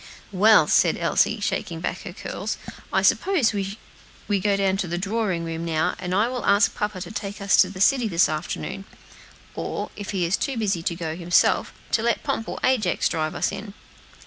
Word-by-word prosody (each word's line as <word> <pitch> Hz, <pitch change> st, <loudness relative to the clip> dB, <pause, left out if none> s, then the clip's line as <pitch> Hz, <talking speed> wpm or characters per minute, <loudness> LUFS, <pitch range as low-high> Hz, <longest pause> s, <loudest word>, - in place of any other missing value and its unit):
"Well," 210 Hz, +3 st, +6 dB, 0.3 s
Elsie -, -, +2 dB
said, -, -, -8 dB
shaking -, -, -2 dB
back -, -, -3 dB
her -, -, -7 dB
curls, -, -, -5 dB, 0.5 s
"suppose 345 Hz, -, +3 dB
we 200 Hz, 0 st, -5 dB
go 200 Hz, +1 st, +1 dB
down 195 Hz, -1 st, +1 dB
to 195 Hz, -, -2 dB
the 175 Hz, +1 st, -2 dB
drawing 195 Hz, -2 st, -1 dB
room 165 Hz, 0 st, -4 dB
now, 165 Hz, +1 st, 0 dB
and 180 Hz, 0 st, -2 dB
I 210 Hz, +4 st, +3 dB
will 250 Hz, 0 st, -4 dB
ask 200 Hz, +1 st, +4 dB
papa 210 Hz, -2 st, -3 dB
to 180 Hz, +2 st, -7 dB
take 205 Hz, -2 st, -5 dB
us 200 Hz, 0 st, +3 dB
to 185 Hz, -, +5 dB
the 190 Hz, -1 st, -9 dB
city 250 Hz, +1 st, +4 dB
this 175 Hz, -3 st, +3 dB
afternoon; 155 Hz, +5 st, -4 dB, 0.7 s
or, -, -, -4 dB
if 205 Hz, -, -7 dB
he 185 Hz, -4 st, 0 dB
is 170 Hz, +3 st, +1 dB
too 270 Hz, -3 st, -2 dB
busy 200 Hz, -6 st, 0 dB
to 170 Hz, 0 st, -2 dB
go 165 Hz, -2 st, -4 dB
himself, 175 Hz, 0 st, +2 dB, 0.2 s
to 225 Hz, -, +2 dB
let 235 Hz, +1 st, 0 dB
Pomp 225 Hz, -, -2 dB
or -, -, -5 dB
Ajax 225 Hz, -9 st, +2 dB
drive 155 Hz, -1 st, -2 dB
us -, -, 0 dB
in." 200 Hz, +1 st, -8 dB
195 Hz, 195 wpm, -24 LUFS, 175-215 Hz, 0.7 s, Well